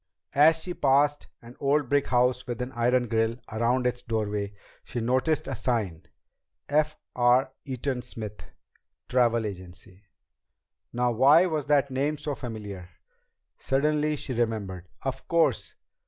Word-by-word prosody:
As 155 +3 +6
she 180 - -4
passed 145 0 +2 0.2
an 120 +1 -12
old 140 0 +2
brick 140 +2 +2
house 125 +1 +2
with 120 -2 -4
an 125 +1 -3
iron 125 0 +2
grill 115 +1 +1 0.2
around 120 +3 +1
its 125 0 0
doorway, 105 -2 -2 0.3
she 120 - -5
noticed 130 +6 +1
a 135 - -3
sign: 105 -8 -2 0.6
F. 155 +1 +1 0.2
R. 125 +2 +3
EATON 130 -1 -3
SMITH 110 -4 -8 0.6
TRAVEL 120 -3 +2
AGENCY. 95 0 -9 0.9
Now 120 0 +1
why 140 +9 +6
was 155 -5 -2
that 140 -2 +3
name 140 +4 0
so 145 0 -3
familiar? 105 -8 -7 0.7
Suddenly 150 +2 +1
she 135 - -5
remembered. 105 -7 -2
Of 130 0 -4
course! 170 -1 +1
125 Hz, 135 wpm, -27 LUFS, 115-140 Hz, 0.9 s, As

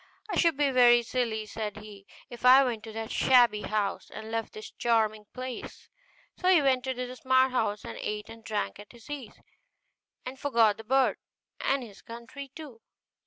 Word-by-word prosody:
'I - - -1
should 335 -5 +3
be 290 -2 +2
very 240 -2 +6
silly,' 225 -3 -2
said 215 -1 -5
he, 210 -2 -12 0.2
'if 240 -1 -11
I 260 +2 +8
went 235 -4 -2
to 220 - -8
that 225 +1 -6
shabby 240 -5 +4
house, 210 -1 -2
and 220 +1 -9
left 225 0 -3
this 435 0 -9
charming 215 -3 0
place'; 255 -1 -8 0.5
so 365 - -3
he 370 -3 +7
went 265 -3 +1
into 250 -1 -2
the 250 +1 -8
smart 260 0 +3
house, 215 -4 -1
and - - -7
ate 210 0 -4
and 225 0 -12
drank 210 -2 -3
at 205 +2 -13
his 235 +4 -13
ease, 270 -7 -7 0.9
and 255 +1 -7
forgot 230 -7 +3
the 225 - -9
bird, 265 +4 +2 0.4
and 275 -1 0
his 210 -5 -13
country 235 +4 -10
too. 280 -8 -10
240 Hz, 185 wpm, -28 LUFS, 220-260 Hz, 0.9 s, I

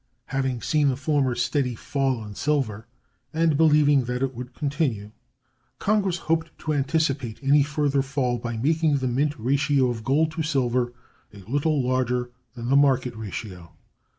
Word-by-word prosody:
Having 130 -3 -1
seen 150 -2 +2
the 130 - 0
former 140 -2 0
steady 125 0 0
fall 130 -2 -1
in 105 - -8
silver, 115 -5 -1 0.5
and 160 -1 +3
believing 145 -3 +4
that 125 +2 -2
it 135 -1 -1
would 125 +1 -8
continue, 140 -8 -2 0.7
Congress 195 -4 +1
hoped 165 0 -1
to 155 - -2
anticipate 140 -4 0
any 145 +2 +5
further 145 -1 +1
fall 135 -3 -1
by 120 0 -4
making 155 +4 +2
the 130 -1 -1
mint 140 +4 0
ratio 135 +2 +2
of 115 -2 -6
gold 155 +6 +2
to 160 +1 -4
silver 125 -5 0 0.4
a 105 - -14
little 145 0 0
larger 125 -1 0 0.2
than 120 0 -5
the 135 - +4
market 130 -3 +3
ratio. 100 -5 -7
135 Hz, 155 wpm, -24 LUFS, 120-150 Hz, 0.7 s, any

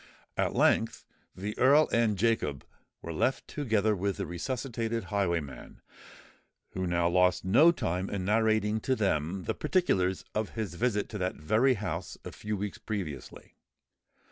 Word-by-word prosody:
At - - 0
length - - +2 0.3
the 105 +3 -5
Earl 145 +4 +6
and 115 -3 +2
Jacob 100 - 0 0.4
were 85 - -5
left 130 +11 0
together 110 -7 +1
with 100 0 -2
the - - -3
resuscitated 115 +4 -3
highwayman, 85 -10 -2 0.9
who 95 0 -3
now 85 0 +1
lost 90 +1 +2
no 135 - +6
time 90 - -2
in 95 -2 -3
narrating 110 0 +2
to 130 +4 0
them 95 -3 -1
the - - -1
particulars 95 - 0
of 110 0 -3
his 105 -6 -3
visit 105 +1 0
to 105 - -6
that 90 0 -1
very 110 - +2
house 95 -4 -4
a - - -6
few 105 0 -4
weeks 105 +2 -5
previously. 95 -11 -6
105 Hz, 145 wpm, -29 LUFS, 90-115 Hz, 0.9 s, Earl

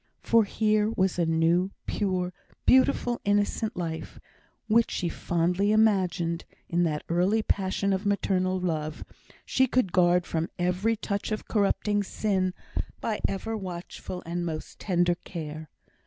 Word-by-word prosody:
For 230 -2 +4
here 215 0 +2
was 190 -4 0
a 170 - +2
new, 165 +3 +3 0.2
pure, 185 -3 -1 0.3
beautiful, 255 -2 +3
innocent 205 +2 0
life, 165 -2 -4 0.5
which 230 +1 +4
she 175 - -1
fondly 175 +5 0
imagined, 185 -6 +2 0.2
in 170 +1 +1
that 150 -2 -1
early 185 +6 +2
passion 195 0 0
of 190 +1 -1
maternal 185 -2 +1
love, 155 -4 -3 0.4
she 260 0 +3
could 245 -7 +1
guard 175 -1 +4
from 165 +1 -2
every 180 +5 +1
touch 200 -1 -3
of 215 - -3
corrupting 205 0 +1
sin 190 -2 -1 0.4
by 215 -2 -2
ever 225 +3 -3
watchful 180 -2 -6
and 175 +1 -2
most 160 -2 -5
tender 175 -2 +2
care. 155 -2 -6
185 Hz, 135 wpm, -27 LUFS, 175-210 Hz, 0.5 s, For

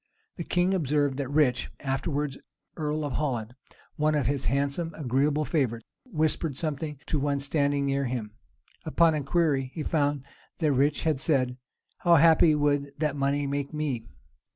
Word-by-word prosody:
The 170 - -5
king 180 +3 +1
observed 145 -5 +1
that 135 -2 -3
Rich, 145 -4 +2
afterwards 140 +1 -2 0.4
earl 155 -1 -2
of 145 - -3
Holland, 120 -6 -2 0.4
one 155 0 +2
of 145 -4 +1
his 140 +1 -1
handsome, 140 +6 -1
agreeable 145 +2 +1
favorites, 120 -8 -1 0.2
whispered 155 - -1
something 150 -2 -3
to 150 - -1
one 140 0 0
standing 140 0 +1
near 140 0 0
him. 120 -4 -3 0.5
Upon 165 0 +3
inquiry, 145 -2 +1
he 155 - -3
found 145 -3 0 0.3
that 155 -4 +1
Rich 140 +2 +1
had 155 -5 +1
said, 130 -4 +2 0.4
"How 170 -1 +5
happy 160 0 +6
would 145 -1 0
that 150 -1 -1
money 140 +1 0
make 140 +1 -3
me!" 135 -7 -2
145 Hz, 150 wpm, -27 LUFS, 135-155 Hz, 0.5 s, happy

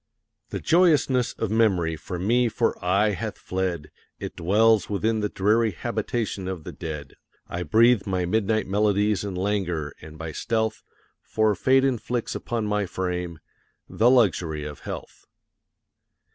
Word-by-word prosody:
The - - -4
joyousness 150 -8 +3
of 110 -2 -3
Memory 95 -8 +2
from 90 +4 -5
me 120 +2 +3
for 115 +1 0
aye 100 +4 +3
hath 95 - -4
fled; 90 -5 -3 0.3
It - - -6
dwells 105 +4 +3
within 110 +2 0
the 105 -1 -1
dreary 110 +4 +2
habitation 100 +2 -3
of 95 -4 -5
the - - -7
dead; 75 -4 -7 0.3
I 85 - -4
breathe 115 +3 +4
my 90 -2 0
midnight 110 +3 +1
melodies 105 +1 +1
in 100 -3 -4
languor 90 -6 -1
and 80 0 -11
by 80 0 -5
stealth, 110 +5 -1 0.4
For 110 -1 +1
Fate 130 +7 +3
inflicts 120 -2 -1
upon 115 -2 -3
my 105 -1 0
frame 90 -3 -3 0.5
the 115 +2 +3
luxury 90 - +2
of 75 -1 -7
health. - - -8
105 Hz, 145 wpm, -25 LUFS, 90-115 Hz, 0.5 s, breathe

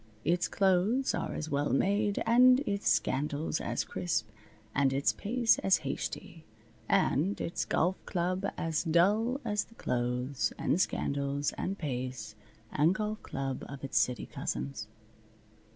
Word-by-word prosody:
Its 175 +3 +2
clothes 195 +7 +2
are - - -3
as 155 - -4
well 145 +1 +1
made, 200 +6 +1
and 250 +3 +6
its 200 -6 0
scandals 150 +3 0
as - - -1
crisp, 160 -11 -2 0.5
and 140 -1 +3
its 140 +1 +2
pace 235 +2 +2
as 190 -1 +4
hasty, 165 - -5 0.5
and 180 +9 +2
its 170 - -2
golf 180 +3 0
club 185 +1 -1
as 165 -1 -1
dull 205 - +2
as 210 -2 0
the 230 - -21
clothes, 125 - -1
and 180 - +1
scandals, 140 -1 -1
and 195 +2 -3
pace, 125 - -4 0.4
and 160 +6 +3
golf 215 0 -3
club 135 -1 -4
of 140 -1 -8
its 120 -6 +1
city 120 +1 0
cousins. 65 +3 -4
165 Hz, 135 wpm, -31 LUFS, 135-200 Hz, 0.5 s, and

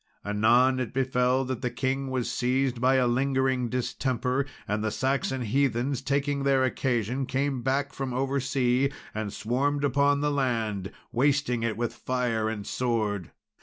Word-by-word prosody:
Anon 120 +5 +3
it 125 0 -4
befell 130 0 +2
that 130 -2 -4
the 125 - 0
king 130 +2 -2
was 130 -2 -1
seized 125 0 0
by 130 +1 +4
a 130 -1 +3
lingering 130 0 +1
distemper, 125 +1 -1 0.2
and 105 +1 -1
the 110 - +1
Saxon 130 +1 -1
heathens, 130 +2 0
taking 140 +1 0
their 135 -1 +3
occasion, 125 0 0
came 135 -1 -1
back 140 +2 0
from 135 -1 -4
over 135 +2 0
sea, 130 0 +1 0.2
and 110 -2 -3
swarmed 140 +7 -1
upon 140 +1 +3
the 150 0 +1
land, 115 -8 -1 0.2
wasting 135 -2 +1
it 115 -1 -1
with 120 0 -2
fire 120 -4 -1
and 105 -2 -5
sword. 110 -7 -1
130 Hz, 155 wpm, -27 LUFS, 120-135 Hz, 0.2 s, by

